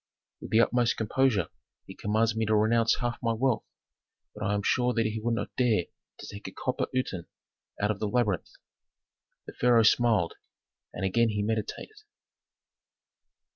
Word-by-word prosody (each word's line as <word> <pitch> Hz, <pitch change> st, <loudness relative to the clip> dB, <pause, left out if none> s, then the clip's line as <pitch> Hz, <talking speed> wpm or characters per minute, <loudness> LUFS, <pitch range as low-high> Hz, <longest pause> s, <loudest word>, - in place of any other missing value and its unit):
With -, -, -8 dB
the 110 Hz, -, +5 dB
utmost 120 Hz, -1 st, +2 dB
composure 110 Hz, -3 st, +1 dB, 0.4 s
he -, -, -10 dB
commands 110 Hz, +2 st, 0 dB
me 110 Hz, -1 st, 0 dB
to 110 Hz, -, +3 dB
renounce 115 Hz, +2 st, +3 dB
half 120 Hz, -1 st, -2 dB
my 115 Hz, -1 st, +1 dB
income, 125 Hz, +1 st, +1 dB, 0.7 s
but 105 Hz, -, -7 dB
I 100 Hz, 0 st, +1 dB
am 100 Hz, -, -2 dB
sure 125 Hz, +3 st, +1 dB
that 115 Hz, -1 st, +2 dB
he 110 Hz, 0 st, -2 dB
would 115 Hz, +1 st, 0 dB
not -, -, -5 dB
dare 115 Hz, -8 st, +3 dB, 0.3 s
to -, -, -10 dB
take 100 Hz, +1 st, -8 dB
a -, -, -7 dB
copper 130 Hz, 0 st, -2 dB
uten 115 Hz, -9 st, -3 dB, 0.5 s
out 105 Hz, +1 st, +1 dB
of 100 Hz, -, -5 dB
the 105 Hz, -, -1 dB
labyrinth." 105 Hz, -4 st, 0 dB, 1.0 s
The -, -, -9 dB
pharaoh 120 Hz, -2 st, +4 dB
smiled, 110 Hz, -6 st, +3 dB, 0.6 s
and 95 Hz, -, -4 dB
again 115 Hz, +5 st, +2 dB
he 105 Hz, -1 st, -1 dB
meditated. 110 Hz, -, -3 dB
110 Hz, 165 wpm, -28 LUFS, 105-120 Hz, 1.0 s, the